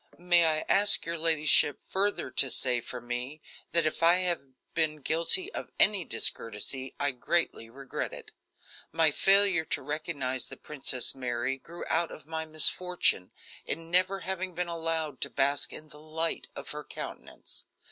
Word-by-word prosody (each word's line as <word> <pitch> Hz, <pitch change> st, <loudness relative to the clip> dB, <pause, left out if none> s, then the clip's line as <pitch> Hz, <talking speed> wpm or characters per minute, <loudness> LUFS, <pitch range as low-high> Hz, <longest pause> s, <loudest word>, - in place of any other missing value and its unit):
"May 175 Hz, -1 st, +4 dB
I 155 Hz, -1 st, +1 dB
ask 205 Hz, +1 st, +5 dB
your 170 Hz, 0 st, -3 dB
ladyship 155 Hz, -3 st, +3 dB
further 195 Hz, -8 st, -1 dB
to 135 Hz, -, +3 dB
say 125 Hz, -1 st, 0 dB
for 125 Hz, -, -8 dB
me 125 Hz, +5 st, -5 dB, 0.3 s
that 170 Hz, -1 st, +2 dB
if 155 Hz, -, -2 dB
I 170 Hz, +1 st, +6 dB
have 180 Hz, -3 st, 0 dB, 0.3 s
been 155 Hz, -3 st, -1 dB
guilty 170 Hz, -, 0 dB
of -, -, -6 dB
any 205 Hz, -4 st, +4 dB
discourtesy 115 Hz, +2 st, 0 dB
I 145 Hz, 0 st, +1 dB
greatly 130 Hz, -3 st, -1 dB
regret 135 Hz, +3 st, -5 dB
it. -, -, -11 dB, 0.6 s
My 160 Hz, -2 st, +3 dB
failure 195 Hz, 0 st, +4 dB
to -, -, -3 dB
recognize 140 Hz, -4 st, -3 dB
the -, -, -10 dB
Princess 135 Hz, -4 st, -1 dB
Mary 125 Hz, 0 st, -2 dB
grew 170 Hz, +5 st, -9 dB
out 165 Hz, +1 st, 0 dB
of 155 Hz, -, -11 dB
my 160 Hz, 0 st, -4 dB
misfortune 155 Hz, -, +4 dB, 0.3 s
in 165 Hz, +2 st, -6 dB
never 185 Hz, +2 st, +2 dB
having 190 Hz, -1 st, -4 dB
been 180 Hz, 0 st, -2 dB
allowed 165 Hz, -4 st, -3 dB
to -, -, -1 dB
bask 140 Hz, +1 st, +1 dB
in 155 Hz, 0 st, -11 dB
the 150 Hz, -, -14 dB
light 160 Hz, +1 st, -3 dB
of -, -, -7 dB
her 150 Hz, 0 st, -6 dB
countenance. -, -, -9 dB
155 Hz, 160 wpm, -29 LUFS, 135-170 Hz, 0.6 s, I